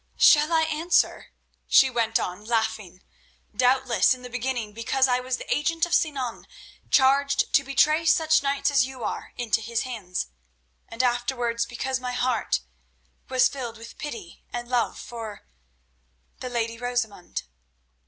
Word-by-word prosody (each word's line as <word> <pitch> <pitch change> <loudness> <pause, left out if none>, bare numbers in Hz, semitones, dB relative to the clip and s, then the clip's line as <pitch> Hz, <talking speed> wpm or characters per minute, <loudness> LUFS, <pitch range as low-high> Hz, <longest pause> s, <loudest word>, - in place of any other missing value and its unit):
"Shall 300 +1 +6
I 325 -1 +4
answer?" 320 +2 +1 0.4
she 270 - +6
went 230 -2 +1
on, 180 +3 -4
laughing. 220 -5 -2 0.5
"Doubtless 255 0 +3
in 250 - -15
the 250 - -9
beginning 245 -3 -3
because 255 +4 +1
I 250 -1 +2
was 250 0 -2
the - - -2
agent 330 +3 +1
of 345 - -5
Sinan, 270 -9 -1 0.4
charged 280 +1 +3
to 275 - +5
betray 305 +4 +2
such 315 -1 +4
knights 280 0 0
as 260 -3 +3
you 260 -3 -9
are - - -4
into 230 -2 0
his 230 +1 -2
hands, 205 - -4 0.6
and 230 +3 -2
afterwards 240 -1 0
because 260 +2 -3
my 250 -1 -4
heart 245 - 0 0.7
was 255 -1 +4
filled 240 -5 -6
with 230 +1 -12
pity 235 - -8
and 240 0 -5
love 245 -1 0
for—the 60 - -12
lady 230 -1 -2
Rosamund." 245 -7 -3
245 Hz, 145 wpm, -25 LUFS, 225-270 Hz, 0.7 s, Shall